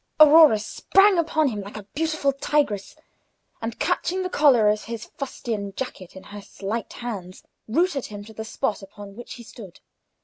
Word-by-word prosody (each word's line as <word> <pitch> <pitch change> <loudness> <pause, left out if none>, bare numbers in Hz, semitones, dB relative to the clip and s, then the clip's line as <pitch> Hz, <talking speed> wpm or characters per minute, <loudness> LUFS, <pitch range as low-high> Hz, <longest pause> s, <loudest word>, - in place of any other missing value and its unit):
Aurora 310 -5 +8
sprang 390 - +3
upon 315 -3 +1
him 210 -4 -4
like 200 +2 -9
a 210 - -8
beautiful 310 -3 0
tigress, 275 -7 -1 0.7
and, 225 0 -4
catching 370 +1 -1
the 365 - -4
collar 260 -10 +5
of 210 0 +1
his 230 -1 -6
fustian 220 -7 -5
jacket 195 -9 -6
in 190 - -10
her 205 0 -10
slight 205 +3 -5
hands, 195 -7 -7 0.2
rooted 295 +3 0
him 205 -1 -9
to 220 - -12
the 220 - -6
spot 220 0 -2
upon 200 0 -11
which 240 - -9
he 240 - -11
stood. 205 -5 -12
230 Hz, 170 wpm, -24 LUFS, 205-295 Hz, 0.7 s, Aurora